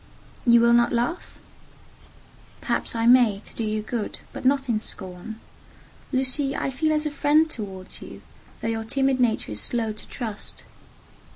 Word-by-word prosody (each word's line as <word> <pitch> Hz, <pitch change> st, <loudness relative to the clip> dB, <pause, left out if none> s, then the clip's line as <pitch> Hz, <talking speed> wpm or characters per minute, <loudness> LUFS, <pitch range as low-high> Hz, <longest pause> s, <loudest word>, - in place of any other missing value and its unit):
"You 235 Hz, 0 st, +7 dB
will 235 Hz, 0 st, +5 dB
not 240 Hz, 0 st, +4 dB
laugh?" 245 Hz, +9 st, -2 dB, 1.2 s
"Perhaps -, -, -1 dB
I 230 Hz, 0 st, 0 dB
may, 240 Hz, -4 st, +6 dB
to -, -, -7 dB
do 230 Hz, -, -2 dB
you 215 Hz, 0 st, -1 dB
good: 220 Hz, -1 st, -3 dB, 0.2 s
but -, -, -7 dB
not 275 Hz, 0 st, +3 dB
in 220 Hz, -3 st, 0 dB
scorn. 190 Hz, +2 st, -7 dB, 0.7 s
Lucy, 270 Hz, +1 st, +1 dB
I 270 Hz, -, -1 dB
feel 310 Hz, +4 st, 0 dB
as 305 Hz, 0 st, +1 dB
a 300 Hz, -, -1 dB
friend 295 Hz, +2 st, +3 dB
towards 195 Hz, -9 st, -6 dB
you, -, -, -10 dB, 0.4 s
though -, -, -2 dB
your 225 Hz, 0 st, -1 dB
timid 270 Hz, +2 st, +1 dB
nature 230 Hz, -, +1 dB
is 105 Hz, -, -1 dB
slow 225 Hz, -3 st, 0 dB
to 215 Hz, -, -9 dB
trust." 220 Hz, -5 st, -5 dB
235 Hz, 165 wpm, -25 LUFS, 220-270 Hz, 1.2 s, You